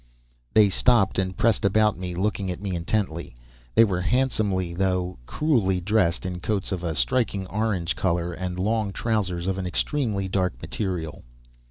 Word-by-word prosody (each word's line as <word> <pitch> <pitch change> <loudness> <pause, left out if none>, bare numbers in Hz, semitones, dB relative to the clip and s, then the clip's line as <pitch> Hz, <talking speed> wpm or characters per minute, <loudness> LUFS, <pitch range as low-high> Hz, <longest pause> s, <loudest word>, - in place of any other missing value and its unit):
They 105 -2 +7
stopped 110 -2 +3
and 95 -1 -2
pressed 115 -1 +2
about 105 +1 +3
me, 90 -1 -5
looking 100 0 -1
at 90 - -4
me 95 -2 -3
intently. 85 - -2 0.4
They 115 - +8
were 95 -5 0
handsomely, 100 -6 0
though 90 -3 -1
crudely 115 -12 +1
dressed 90 -3 +1
in 90 -1 -3
coats 100 +2 -2
of 90 -2 -3
a 80 -2 -2
striking 110 - 0
orange 95 -4 -1
color, 85 -1 0
and 90 +1 -4
long 105 +1 0
trousers 95 -7 -1
of 95 0 -1
an 95 - -3
extremely 105 - -1
dark 90 -8 -1
material. 90 - -4
95 Hz, 160 wpm, -25 LUFS, 90-105 Hz, 0.4 s, They